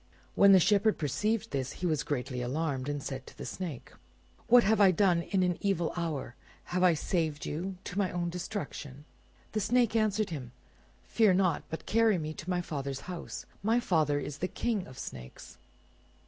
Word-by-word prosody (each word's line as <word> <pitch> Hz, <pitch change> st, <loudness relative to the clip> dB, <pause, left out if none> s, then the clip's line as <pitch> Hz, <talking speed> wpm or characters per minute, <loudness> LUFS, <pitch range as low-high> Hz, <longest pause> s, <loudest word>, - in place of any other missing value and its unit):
When 200 Hz, 0 st, +6 dB
the 190 Hz, -, +8 dB
Shepherd 205 Hz, +3 st, +3 dB
perceived 210 Hz, -, -1 dB
this, 135 Hz, -1 st, -2 dB
he 180 Hz, -, -5 dB
was 155 Hz, -4 st, +1 dB
greatly 130 Hz, -3 st, -3 dB
alarmed, 135 Hz, +1 st, -2 dB
and 145 Hz, -1 st, -3 dB
said 130 Hz, -1 st, -6 dB
to -, -, -13 dB
the -, -, -6 dB
Snake— 170 Hz, -9 st, -6 dB, 0.6 s
"What 245 Hz, 0 st, +7 dB
have 215 Hz, +1 st, +3 dB
I 195 Hz, -, +8 dB
done 185 Hz, -2 st, +3 dB
in 185 Hz, +2 st, 0 dB
an 180 Hz, -1 st, 0 dB
evil 185 Hz, -5 st, 0 dB
hour? 160 Hz, -8 st, -3 dB, 0.4 s
Have 180 Hz, -, +1 dB
I 180 Hz, -2 st, +5 dB
saved 160 Hz, -2 st, -1 dB
you 185 Hz, +5 st, -4 dB
to 185 Hz, -, -4 dB
my 195 Hz, -2 st, +2 dB
own 175 Hz, 0 st, -2 dB
destruction?" 150 Hz, -6 st, -6 dB, 0.5 s
The 215 Hz, -, -1 dB
Snake 235 Hz, +2 st, +2 dB
answered 215 Hz, -2 st, +1 dB
him, 125 Hz, -6 st, -6 dB, 0.5 s
"Fear 215 Hz, -5 st, +3 dB
not, 180 Hz, -5 st, +2 dB
but 160 Hz, -, -6 dB
carry 225 Hz, -3 st, +3 dB
me 155 Hz, -1 st, -4 dB
to 160 Hz, -, -8 dB
my 180 Hz, -1 st, +1 dB
father's 140 Hz, -5 st, -4 dB
house. 180 Hz, -2 st, -7 dB, 0.2 s
My 225 Hz, +4 st, +2 dB
father 155 Hz, -, +1 dB
is 145 Hz, 0 st, -6 dB
the 180 Hz, -, 0 dB
King 220 Hz, -1 st, -2 dB
of 130 Hz, -, -12 dB
the -, -, -7 dB
snakes." 65 Hz, -1 st, -9 dB
175 Hz, 190 wpm, -30 LUFS, 145-200 Hz, 0.6 s, the